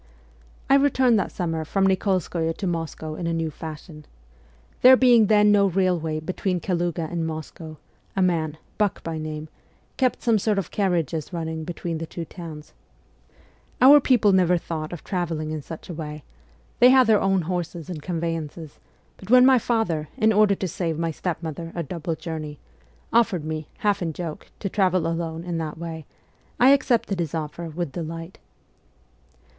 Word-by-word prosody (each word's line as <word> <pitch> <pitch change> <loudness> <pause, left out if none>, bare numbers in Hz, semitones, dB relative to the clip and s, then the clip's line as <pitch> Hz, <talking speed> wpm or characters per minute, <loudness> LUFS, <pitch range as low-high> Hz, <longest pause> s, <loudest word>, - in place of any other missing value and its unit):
I 275 - +6
returned 260 -5 +3
that - - -2
summer 165 -3 -2
from 195 +5 0
Nikolskoye 185 -4 0
to 200 - -4
Moscow 165 -2 -3
in 170 +2 -4
a 170 - 0
new 165 -1 -1
fashion, 155 0 -9 0.8
There 255 +1 +9
being 240 -4 +5
then 210 0 +5
no 200 -1 +5
railway 175 -4 0
between 180 +3 -2
Kaluga 175 -2 -1
and 165 -2 -2
Moscow, 155 0 -7 0.4
a 195 - +1
man, 160 -4 0 0.2
Buck 210 -2 0
by 165 -1 -4
name, 155 0 -5 0.5
kept 255 -2 0
some 225 -3 +3
sort 210 +1 0
of 195 -5 -2
carriages 170 -6 -1
running 160 -2 -4
between 170 -1 -4
the 165 - -5
two 170 0 -6
tow 175 - -12
r 165 -2 -6
ns. 150 0 -13 1.1
Our 275 +4 +9
people 240 -7 +3
never 180 -2 +4
thought 160 -2 -5
of 175 - -7
travelling 165 -5 -3
in 155 -1 -4
such 160 +3 -9
a 175 - -6
way: 150 -2 -7 0.6
they 250 - +8
had 260 0 +6
their 220 -2 +4
own 195 -2 +2
horses 175 -1 -4
and 170 -5 -6
convey 165 0 -2
ances; 155 -1 -8 0.4
but 190 - -13
when 250 +1 +7
my 260 -1 +6
father, 190 -11 -1
in 220 -3 +3
order 210 -1 +4
to 190 - -3
save 165 -2 -3
my 165 0 -1
step 170 +1 -4
mother 165 +1 -5
a 170 - -2
double 165 +1 -4
journey, 155 -3 -6 0.6
offered 205 -9 +2
me, 155 -1 -4
half 205 -2 0
in 165 -2 -2
joke, 165 -1 -6
to 200 - -1
travel 185 -3 +1
alone 165 0 -3
in 170 -1 -3
that 155 -1 -4
way, 160 -2 -7 0.5
I 250 - +7
accepted 245 -8 +2
his 165 -2 -2
offer 160 +2 -5
with 165 -1 -4
delight. 165 +1 -6
170 Hz, 175 wpm, -24 LUFS, 160-195 Hz, 1.1 s, There